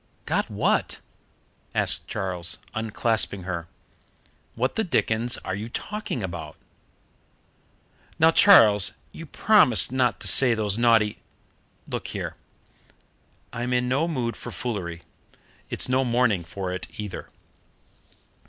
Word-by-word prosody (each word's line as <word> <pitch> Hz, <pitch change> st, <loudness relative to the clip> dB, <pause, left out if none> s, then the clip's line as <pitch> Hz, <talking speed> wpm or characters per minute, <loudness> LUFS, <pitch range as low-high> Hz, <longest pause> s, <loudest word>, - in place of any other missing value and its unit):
"Got -, -, -1 dB
what?" -, -, 0 dB, 0.8 s
asked -, -, -1 dB
Charles, 90 Hz, -3 st, -3 dB, 0.2 s
unclasping 110 Hz, -3 st, 0 dB
her. 85 Hz, -2 st, -4 dB, 0.9 s
"What 125 Hz, +3 st, 0 dB
the 220 Hz, -, +1 dB
dickens 120 Hz, -, 0 dB
are 95 Hz, -, -3 dB
you 105 Hz, +4 st, -5 dB
talking 205 Hz, -, -4 dB
about?" 85 Hz, -4 st, -6 dB, 1.6 s
"Now, 160 Hz, +1 st, +5 dB
Charles, 110 Hz, -, +6 dB, 0.2 s
you 165 Hz, -, -10 dB
promised 145 Hz, -, +4 dB
not 125 Hz, -2 st, +1 dB
to -, -, 0 dB
say 125 Hz, -3 st, +4 dB
those 105 Hz, -2 st, -1 dB
naughty 115 Hz, -3 st, +3 dB, 0.3 s
" -, -, -39 dB
"Look -, -, -5 dB
here, -, -, -5 dB, 1.2 s
I'm 120 Hz, +2 st, -2 dB
in 125 Hz, 0 st, +1 dB
no 140 Hz, +6 st, +1 dB
mood 125 Hz, -8 st, -2 dB
for -, -, -8 dB
foolery. 90 Hz, -8 st, -5 dB, 0.7 s
It's -, -, -2 dB
no 130 Hz, +1 st, +2 dB
morning 120 Hz, -7 st, +1 dB
for 90 Hz, +2 st, -5 dB
it 90 Hz, -, -6 dB
either." 105 Hz, -3 st, -6 dB
115 Hz, 120 wpm, -25 LUFS, 95-125 Hz, 1.6 s, Charles